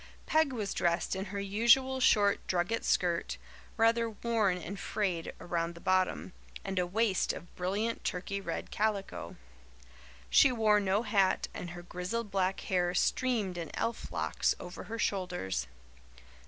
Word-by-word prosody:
Peg 315 -3 +3
was 215 -6 -3
dressed 170 +2 0
in 190 +1 -3
her 200 0 -5
usual 235 +7 +3
short 205 -5 +4
drugget 185 +6 0
skirt, 175 -2 +1 0.4
rather 230 0 +3
worn 220 -4 0
and 180 +3 -6
frayed 180 -6 -2
around 170 -1 -2
the - - -10
bottom, 185 0 0 0.3
and 190 -1 -1
a 180 - 0
waist 205 +1 +1
of 175 - -10
brilliant 205 +6 -2
turkey 200 +1 -3
red - - -5
calico. 200 - -2 0.9
She 275 - +6
wore 215 -3 +4
no 200 +2 +1
hat, 200 -4 +2
and 175 - -6
her 175 0 -8
grizzled 190 +5 -4
black 190 -1 0
hair 180 -1 0
streamed 215 -6 +1
in 165 - -5
elf 230 - -3
locks - - 0
over 180 +1 -8
her 225 +4 -5
shoulders. 180 - -1
195 Hz, 145 wpm, -31 LUFS, 180-225 Hz, 0.9 s, She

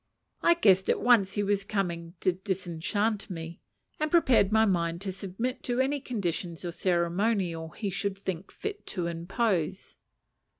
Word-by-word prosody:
I 340 - +5
guessed 190 - +4
at - - +3
once 220 -6 +4
he 205 - 0
was 200 0 +1
coming 175 -4 -3
to 185 - +3
disenchant 190 +3 -2
me, 165 -2 -7 0.4
and 310 0 0
prepared 260 - +4
my 220 +1 +5
mind 170 -4 0
to 195 -1 -2
submit 195 +7 -4
to 245 0 0
any 275 +2 +1
conditions 180 - -3
or 175 - -2
ceremonial 175 -1 0
he 200 +5 -4
should 195 +1 -2
think 190 -2 -5
fit 420 -1 -6
to 180 -4 -2
impose. 180 +1 -1
195 Hz, 155 wpm, -28 LUFS, 170-220 Hz, 0.4 s, I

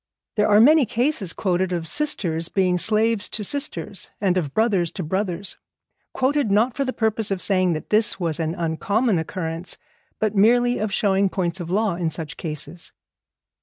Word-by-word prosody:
There 210 - +2
are 205 0 +6
many 285 +2 +6
cases 235 - 0
quoted 185 -1 -1
of 170 -2 -2
sisters 170 - -1
being 180 -2 +1
slaves 220 +1 +2
to 215 - -4
sisters, 205 - -3
and 190 -3 +1
of 160 -7 -1
brothers 200 -5 +1
to 185 - -4
brothers, 190 +2 -3 0.5
quoted 270 -2 +1
not 220 +5 +3
for 280 - 0
the 260 - -2
purpose 220 -2 0
of 195 -2 -1
saying 185 -1 +2
that 155 - -6
this 215 -1 +2
was 165 -3 -2
an 160 0 -1
uncommon 195 +6 0
occurrence, 165 +1 -5 0.4
but 215 -1 0
merely 245 +4 +4
of 215 -1 -2
showing 195 -1 +2
points 180 -1 -2
of 170 -1 -6
law 205 +1 +1
in 170 -2 -1
such 160 +1 -4
cases. 155 +1 -5
195 Hz, 170 wpm, -23 LUFS, 170-220 Hz, 0.5 s, are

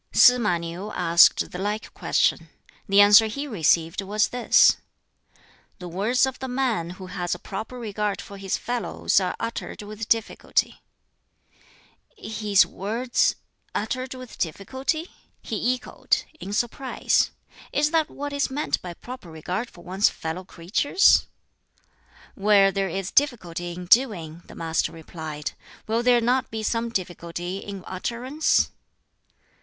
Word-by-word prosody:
Sz 250 0 +7
ma 210 -7 +1
Niu 170 +5 -6
asked 170 -1 +5
the 180 - -6
like 210 +2 -3
question. - - +1 0.4
The 200 +1 +7
answer 205 +2 +8
he 280 +7 -4
received 170 - +1
was 210 +2 +1
this: 245 -1 +5 1.0
"The 180 - -8
words 210 +10 +2
of 265 -1 -5
the 265 - -4
man 250 -9 -1
who 190 - -8
has 180 -1 -3
a - - -8
proper 215 +7 -7
regard 210 -3 -2
for 200 -1 -9
his 195 -1 -1
fellows 240 -3 0
are 185 -2 -2
uttered 230 -2 -5
with 215 +1 -7
difficulty." 225 -1 0 1.4
"'His 210 - +2
words 230 +6 0 0.4
uttered 255 +4 -3
with 255 -2 -11
difficulty?'" 260 - -2 0.4
he 235 +3 0
echoed, 250 - -1 0.2
in 195 - -7
surprise. 240 +5 +1 0.4
"Is 300 +1 +1
that 320 -2 +2
what 290 0 -6
is 285 -1 0
meant 290 +3 -1
by 175 -1 -7
proper 245 -5 -10
regard 180 +9 -4
for 175 - -16
one's 190 +3 +2
fellow 160 +3 -5
creatures?" 195 - +3 1.1
"Where 200 -1 +4
there 195 -1 -1
is 190 +2 -4
difficulty 175 - 0
in 180 +1 -7
doing," 175 -7 +2
the - - -12
Master 165 -1 -1
replied, 160 -2 -6 0.3
"will 225 +2 0
there 245 -1 +4
not 250 +3 +1
be 220 -1 -4
some 230 +1 -1
difficulty 175 -2 -4
in 200 -2 -8
utterance?" 245 +10 0
210 Hz, 140 wpm, -24 LUFS, 180-245 Hz, 1.4 s, answer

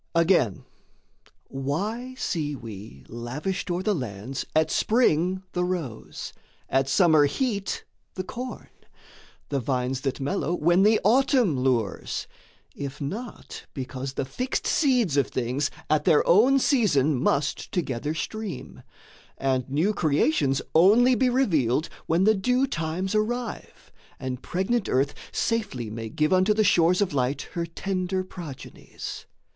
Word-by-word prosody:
Again, 165 - +2 0.8
why 205 - -3
see 155 - -2
we 105 - -10
lavished 140 - -4
o'er 175 +1 -1
the 210 - +2
lands 125 - -5
At 155 0 +3
spring 185 -5 +2
the 180 - -1
rose, 175 -11 -4 0.3
at 135 0 +1
summer 160 -2 +5
heat 200 - -2 0.3
the 185 - -3
corn, 250 +6 -7 0.8
The 140 - 0
vines 125 +1 -1
that 135 0 -2
mellow 145 +4 -1
when 175 +3 +3
the 215 +2 +5
autumn 240 - +3
lures, 125 -6 -1 0.5
If 140 0 -6
not 210 - -6
because 130 0 -5
the 135 - -2
fixed 250 - -3
seeds 245 - +2
of 140 - +3
things 130 +3 -1 0.2
At 155 0 +1
their 160 -5 +4
own 235 +10 +6
season 195 - +3
must 140 +2 0
together 150 -3 -2
stream, 215 +5 -5 0.6
And 130 -1 0
new 160 +10 +1
creations 150 -4 +1
only 220 +10 +6
be 255 +1 +3
revealed 160 - +1 0.2
When 165 +3 +2
the 215 +2 +5
due 250 +6 +2
times 170 -2 -2
arrive 230 +2 -3 0.3
and 130 -1 -4
pregnant 195 +5 -1
earth 135 +3 +1 0.2
Safely 195 - -2
may 115 0 -5
give 150 +9 +1
unto 185 +3 +4
the 215 - +3
shores 180 -1 +4
of 195 -6 0
light 130 +1 0
Her 170 -1 -2
tender 185 +2 -2
progenies? 170 -7 -9
165 Hz, 130 wpm, -26 LUFS, 135-205 Hz, 0.8 s, own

